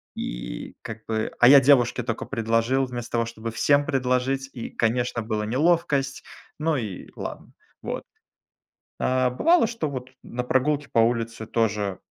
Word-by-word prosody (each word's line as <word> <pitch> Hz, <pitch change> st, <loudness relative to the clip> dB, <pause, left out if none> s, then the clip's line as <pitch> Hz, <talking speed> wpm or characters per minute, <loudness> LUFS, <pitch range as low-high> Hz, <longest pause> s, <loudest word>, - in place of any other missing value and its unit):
И -, -, -6 dB
как 110 Hz, -1 st, -8 dB
бы 110 Hz, -1 st, -1 dB
а 120 Hz, -, +7 dB
я 140 Hz, +2 st, +10 dB
девушке 125 Hz, -2 st, +4 dB
тока 115 Hz, -2 st, -3 dB
предложил 115 Hz, +2 st, +1 dB
вместо 120 Hz, -2 st, -6 dB
того, 115 Hz, -1 st, +2 dB
чтобы 115 Hz, 0 st, -6 dB
всем 145 Hz, +5 st, +3 dB
предложить. 135 Hz, +1 st, 0 dB
И, 120 Hz, -, -6 dB
конечно, 120 Hz, +1 st, 0 dB
была 110 Hz, -1 st, -2 dB
неловкость, 140 Hz, +1 st, +1 dB, 0.4 s
но 155 Hz, -1 st, +1 dB
и 105 Hz, -6 st, -5 dB
ладно -, -, -7 dB, 0.3 s
вот. -, -, -4 dB, 1.0 s
А 130 Hz, -1 st, +2 dB
бывало, 330 Hz, -, +4 dB
что 225 Hz, -9 st, -3 dB
вот 130 Hz, -2 st, -6 dB
на 125 Hz, +1 st, -4 dB
прогулке 140 Hz, +3 st, +1 dB
по -, -, 0 dB
улице 115 Hz, -1 st, +1 dB
тоже 105 Hz, -4 st, -1 dB
125 Hz, 150 wpm, -25 LUFS, 115-135 Hz, 1.0 s, я